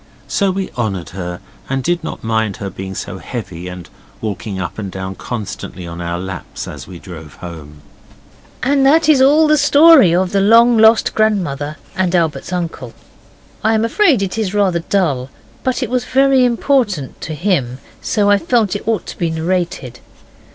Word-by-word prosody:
So 200 -2 +1
we 190 0 -3
honoured 100 -8 -3
her, 90 -1 -6 0.3
and 135 -1 -1
did 175 +3 0
not - - -6
mind 110 -3 -1
her 100 -2 -5
being 95 +1 -7
so - - -6
heavy 90 -7 -7
and 90 -1 -8 0.3
walking 100 -2 -4
up 85 +2 -5
and 100 -3 -5
down 95 0 -5
constantly 100 -4 -6
on 85 0 -7
our 85 0 -3
laps 95 -1 -7
as - - -9
we 90 - -9
drove 80 -4 -11
home. 75 -4 -10 0.8
And 275 +1 +2
that 305 +3 +4
is 295 -4 +5
all 295 +4 +5
the 305 -1 +4
story 290 - +6
of 185 0 +1
the 200 - +2
long 230 +4 +6
lost 220 +1 +5
grandmother 170 -9 0 0.2
and 185 -1 0
Albert's 165 0 -1
uncle. 165 -9 -4 0.7
I 220 +1 +3
am 220 +1 +1
afraid 265 - +3
it 195 +3 -3
is 210 -2 -2
rather 190 -4 +2
dull, 160 -8 -1 0.3
but 255 -1 0
it - - -3
was 250 -1 0
very 270 -1 +4
important 235 - 0
(to 155 - -5
him), 145 -8 0 0.2
so 205 -2 +1
I 205 0 +4
felt 220 -3 +1
it 205 - -6
ought 225 -4 0
to - - -8
be 170 - 0
narrated. 165 -6 -2
175 Hz, 180 wpm, -17 LUFS, -, 0.8 s, story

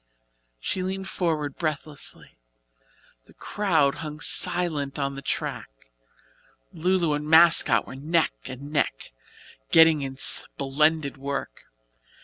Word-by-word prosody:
She 185 - -3
leaned 190 +1 -4
forward 155 -7 -2
breathlessly. 155 -2 -5 0.9
The - - -22
crowd 160 -9 0
hung 150 -1 -7
silently 150 -5 +1
on 140 0 -2
the 140 - -8
track. - - -4 1.0
"Lu 185 +4 +1
Lu" 170 -4 0
and 150 0 -3
"Mascot" 160 -8 +6
were - - -10
neck 160 +5 0
and 140 +3 -9
neck, 150 - -2 0.6
getting 160 -2 +5
in 135 -1 -6
splendid 145 +2 +1
work. 140 - -6
150 Hz, 115 wpm, -25 LUFS, 140-165 Hz, 1.0 s, Mascot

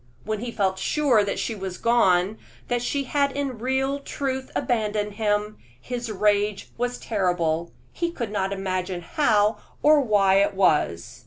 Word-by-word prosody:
When 215 -1 -3
he 240 +2 -4
felt 190 -3 0
sure 265 -7 +2
that 200 - -2
she 230 - -2
was 190 -3 -6
gone, 200 -4 +2 0.3
that 245 -1 0
she 275 +3 -1
had 280 +1 +1
in 275 -4 -3
real 265 +3 0
truth 265 -2 -4
abandoned 210 -4 -1
him, 210 0 -1 0.2
his 240 - -5
rage 205 0 +1
was 245 +1 -2
terrible; 170 -5 -1 0.2
he 340 0 -1
could 235 -10 -5
not 195 -2 -1
imagine 185 -2 -2
how 210 - +2 0.2
or 300 0 +6
why 200 -5 +3
it 200 0 +1
was. 125 - +1
210 Hz, 155 wpm, -24 LUFS, 195-245 Hz, 0.3 s, or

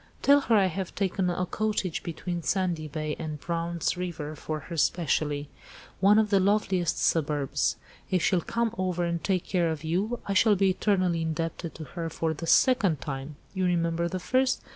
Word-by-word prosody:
"Tell 285 +1 +7
her 230 - +2
I 200 -2 +5
have 185 0 -3
taken 190 -1 0
a 180 +1 -1
cottage 205 -3 -1
between 175 +1 -4
Sandy 175 -3 -1
Bay 155 0 -3
and 155 -2 -5
Brown's 170 +1 -2
River 170 -4 -5
for 155 0 -4
her 170 +5 -7
specially; 150 -3 0 0.5
one 200 +3 +5
of 220 -1 +2
the 200 - +5
loveliest 190 -3 +1
suburbs. 150 -3 +1 0.3
If 185 -3 +1
she'll 180 -2 +3
come 235 +4 -1
over 180 -2 0
and 170 -1 -2
take 185 -3 0
care 175 -3 +1
of 160 -1 -4
you, 195 +9 -1
I 200 - 0
shall 210 +2 +5
be 195 0 +3
eternally 185 -3 +1
indebted 165 +1 -3
to 160 - -7
her 165 +3 -5
for 160 0 -1
the 165 +2 -6
second 200 - +4
time. 135 +1 -5 0.2
You 190 -2 0
remember 170 -1 +1
the 185 - -3
first? 255 +7 +1
175 Hz, 185 wpm, -27 LUFS, 160-190 Hz, 0.5 s, Tell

